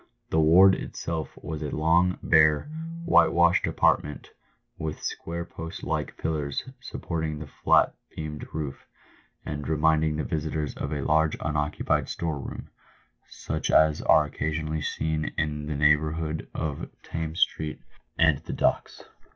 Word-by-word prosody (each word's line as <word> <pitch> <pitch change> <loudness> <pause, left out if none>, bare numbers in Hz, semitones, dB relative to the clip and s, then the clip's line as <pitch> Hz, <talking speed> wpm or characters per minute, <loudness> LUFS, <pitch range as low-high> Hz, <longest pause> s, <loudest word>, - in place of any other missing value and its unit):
The 80 - +3
ward 90 +5 +7
itself 80 -3 -4
was 80 -1 -5
a 75 - -3
long, 85 +4 +2
bare, 75 -1 +5 0.4
whitewashed 85 - +4
apart - - +3
ment, 75 -4 -9 0.5
with 80 -1 -4
square 85 +1 -4
post 80 -1 -8
like - - -2
pillars 75 - -2
supporting 80 -10 -4
the 75 - -7
flat 70 - +3 0.2
beamed 75 -1 -6
roof, 75 -3 -5 0.6
and 75 -3 -4
reminding 80 0 +2
the 80 - -2
visitor 80 -1 -2
of 70 - -4
a 70 -3 -2
large 80 0 +2
unoccupied 75 -1 -1
store 80 -4 -3
room - - -8 0.4
— - - -39 0.2
such - - -2
as 80 -1 +4
are 75 - +5
occasionally 80 +1 -3
seen 80 +1 -2
in 75 -1 -2
the 75 - -2
neighbourhood 75 +2 +1
of 75 -3 -4
Thames 80 +1 -4
street 75 -1 0 0.4
and 80 -4 +4
the - - -7
Docks. - - 0
80 Hz, 140 wpm, -26 LUFS, 75-80 Hz, 0.6 s, ward